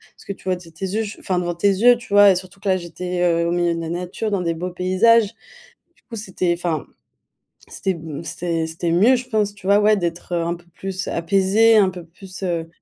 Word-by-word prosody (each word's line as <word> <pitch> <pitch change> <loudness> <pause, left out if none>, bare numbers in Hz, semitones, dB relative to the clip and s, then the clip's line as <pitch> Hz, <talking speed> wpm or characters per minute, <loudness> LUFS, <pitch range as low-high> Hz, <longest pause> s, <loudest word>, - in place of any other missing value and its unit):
ce - - -18
que - - -5
tu - - -20
vois 185 -1 +1
de 175 -2 -13
tes 165 +4 -6
yeux, 210 +4 -1
je 210 0 -8
enfin, 185 -1 -2
devant 175 -1 -1
tes 170 +4 +1
yeux, 230 +5 +5
tu 235 -4 -9
vois? 205 -1 +8
Et - - +2
surtout 185 +2 -7
que 200 - -2
là, 185 - +3
j'étais, 180 +1 -5
heu, 170 -1 +2
au - - 0
milieu 175 -1 +1
de 165 - -4
la 165 - -5
nature, 180 +5 -4
dans 195 - 0
des 170 -1 -1
beaux 180 +3 -5
paysages. 200 +5 +3 0.6
Du - - -31
coup, 235 - -7
c'était 185 -4 -1
enfin, 170 -4 -2 0.8
c'était 190 - -2
m 160 -3 -7
c'était 165 -2 -2
c'était 165 +1 -3
mieux 210 +10 +5
je 250 0 -5
pense, 210 -3 0
tu 200 - -16
vois, 200 +1 +5
ouais, 210 +1 +4
d'être 175 -1 -4
un 170 0 -1
peu 175 - -17
plus 190 -1 -5
apaisée, 195 +6 +3
un 200 -3 +5
peu 180 -2 -9
plus, 185 +3 -11
heu 170 -3 -2
185 Hz, 245 wpm, -21 LUFS, 170-200 Hz, 0.8 s, vois